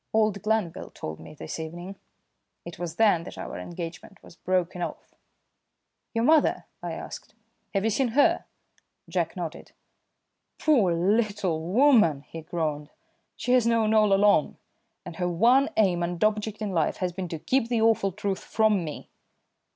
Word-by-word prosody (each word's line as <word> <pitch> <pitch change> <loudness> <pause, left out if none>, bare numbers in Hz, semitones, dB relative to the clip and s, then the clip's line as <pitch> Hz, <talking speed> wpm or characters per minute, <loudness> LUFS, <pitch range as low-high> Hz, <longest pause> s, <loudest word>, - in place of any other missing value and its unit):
Old 215 -3 +2
Glanville 215 -6 -1
told 80 0 -7
me - - -12
this 155 - -7
evening. 175 +4 -7 0.7
It 170 -1 -9
was 170 -2 -4
then 210 -6 +4
that - - -9
our - - -6
engagement 175 +2 -8
was - - -15
broken 180 -1 -1
off." - - -6 1.0
"Your 230 - +1
mother?" 310 +3 +3 0.2
I - - -4
asked. - - -9 0.4
"Have 195 - +1
you 225 - +1
seen 260 +4 +1
her?" 290 - +4 0.6
Jack - - -2
nodded. - - -7 0.8
"Poor 240 - +3
little 195 -1 +1
woman!" 205 - +4
he 165 +2 -9
groaned. 155 -2 -3 0.5
"She 245 - -2
has 245 -2 +4
known 225 -2 +2
all 215 -2 +4
along, 195 -5 +3 0.5
and 165 - -8
her 180 -1 0
one 240 +11 +4
aim 185 -5 +3
and 170 +1 -2
object 215 0 0
in 205 - -2
life 165 -4 0
has 180 -2 -2
been 185 0 -4
to 165 - -5
keep 255 - 0
the 230 -2 +1
awful 220 -3 +3
truth 195 0 -3
from 215 -4 +2
me. 155 -2 -7
195 Hz, 160 wpm, -26 LUFS, 170-220 Hz, 1.0 s, then